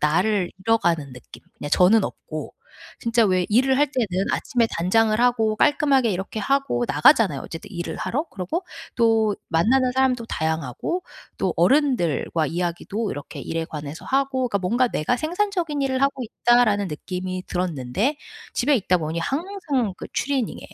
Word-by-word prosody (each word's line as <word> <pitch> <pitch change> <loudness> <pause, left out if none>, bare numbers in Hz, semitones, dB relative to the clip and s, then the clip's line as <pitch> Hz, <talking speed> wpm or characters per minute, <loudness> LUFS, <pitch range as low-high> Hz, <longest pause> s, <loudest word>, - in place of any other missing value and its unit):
나를 180 +5 +1
잃어가는 175 - +1
느낌. 125 - -13 0.2
그냥 145 - -6
저는 195 +6 +5
없고. 155 -1 -7 0.5
진짜 230 0 +2
왜 185 -2 +2
일을 260 +5 +3
할 290 +2 +3
때는 200 -8 -1
아침에 235 -2 0
단장을 215 +5 +2
하고 230 -3 +2
깔끔하게 275 -2 +3
이렇게 190 +4 -4
하고 275 +2 0
나가잖아요, 215 - +4
어쨌든 165 - -9
일을 175 -2 -4
하러. 290 +6 -2
그러고 195 - -4 0.3
또 225 -3 +3
만나는 250 +11 +3
사람도 250 -2 +1
다양하고 160 - -2 0.4
또 - - 0
어른들과 200 - +2
이야기도 175 +6 -3
이렇게 145 - -7
일에 165 0 -3
관해서 150 -1 -7
하고 265 -1 0
그러니까 200 - 0
뭔가 235 +7 +1
'내가 190 +4 0
생산적인 335 -1 -1
일을 260 -1 0
하고 275 -1 +1
있다.'라는 225 -3 +2
느낌이 185 +4 -5
들었는데 180 - -1 0.4
집에 285 +3 +2
있다 185 -5 +1
보니 160 0 -3
항상 285 - -2
그 - - -8
추리닝에 265 -4 -1
220 Hz, 360 characters per minute, -23 LUFS, 175-265 Hz, 0.5 s, 저는